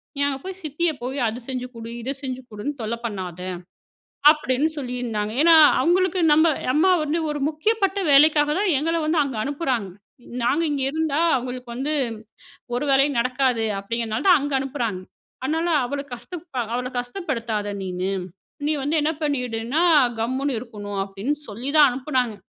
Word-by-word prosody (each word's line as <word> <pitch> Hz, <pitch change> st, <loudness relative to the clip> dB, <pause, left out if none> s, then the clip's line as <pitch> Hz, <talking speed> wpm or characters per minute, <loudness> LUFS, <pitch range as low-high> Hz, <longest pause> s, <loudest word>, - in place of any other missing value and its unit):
"நீ -, -, -6 dB
அங்க 275 Hz, -1 st, -2 dB
போய் 380 Hz, 0 st, -6 dB
சித்திய 315 Hz, +3 st, 0 dB
போய் 265 Hz, +3 st, -3 dB
அது 225 Hz, +3 st, -6 dB
செஞ்சு 255 Hz, -1 st, -3 dB
கொடு, 230 Hz, 0 st, -7 dB
இத 265 Hz, +4 st, -3 dB
செஞ்சு 260 Hz, -1 st, -4 dB
கொடுன்னு 215 Hz, +7 st, -4 dB
தொல்ல 220 Hz, +1 st, -2 dB
பண்ணாத!" 185 Hz, -5 st, -5 dB, 0.9 s
அப்டின்னு 300 Hz, -1 st, 0 dB
சொல்லியிருந்தாங்க. 245 Hz, -5 st, -3 dB
ஏனா, 335 Hz, 0 st, +7 dB, 0.3 s
அவங்களுக்கு 370 Hz, +1 st, +2 dB
நம்ம 315 Hz, +2 st, +5 dB, 0.2 s
அம்மா 365 Hz, +5 st, +4 dB
வந்து 305 Hz, +2 st, -1 dB
ஒரு 295 Hz, -1 st, -4 dB
முக்கியப்பட்ட 390 Hz, +5 st, 0 dB
வேலைக்காக 295 Hz, +1 st, +6 dB
தான் 405 Hz, -2 st, +2 dB
எங்கள 330 Hz, +3 st, 0 dB
வந்து 315 Hz, +1 st, +2 dB
அங்க 270 Hz, -5 st, -4 dB
அனுப்புறாங்க. 265 Hz, -, -2 dB, 0.5 s
நாங்க 290 Hz, +7 st, +2 dB
இங்க 280 Hz, -2 st, -1 dB
இருந்தா, 315 Hz, 0 st, 0 dB, 0.2 s
அவங்களுக்கு 250 Hz, 0 st, -6 dB
வந்து 275 Hz, +5 st, -1 dB, 0.8 s
ஒரு 245 Hz, -, -1 dB
வேலையும் 275 Hz, 0 st, +3 dB
நடக்காது 255 Hz, -2 st, +1 dB, 0.2 s
அப்டிங்கிறனால 230 Hz, -, -2 dB
தான் 350 Hz, -4 st, +7 dB
அங்க 290 Hz, 0 st, -3 dB
அனுப்புறாங்க. 245 Hz, -8 st, -3 dB, 0.4 s
அதனால, 320 Hz, +5 st, 0 dB, 0.2 s
"அவள 280 Hz, +3 st, -3 dB
கஷ்ட 240 Hz, +5 st, -10 dB, 0.4 s
அவள 250 Hz, +1 st, -1 dB
கஷ்டப்படுத்தாத 240 Hz, -, -3 dB
நீனு. 185 Hz, 0 st, -3 dB, 0.6 s
நீ 300 Hz, -, +1 dB
வந்து 295 Hz, +4 st, 0 dB
என்ன 305 Hz, +2 st, +1 dB
பண்ணிடுனா, 250 Hz, -1 st, -1 dB, 0.4 s
கம்முனு 260 Hz, +5 st, -1 dB
இருக்கணும்" 205 Hz, -4 st, -6 dB
அப்டின்னு 200 Hz, +9 st, -3 dB
சொல்லி 235 Hz, +6 st, -5 dB
தான் 295 Hz, -2 st, +8 dB
அனுப்புனாங்க. 255 Hz, -3 st, -1 dB
265 Hz, 150 wpm, -23 LUFS, 235-305 Hz, 0.9 s, தான்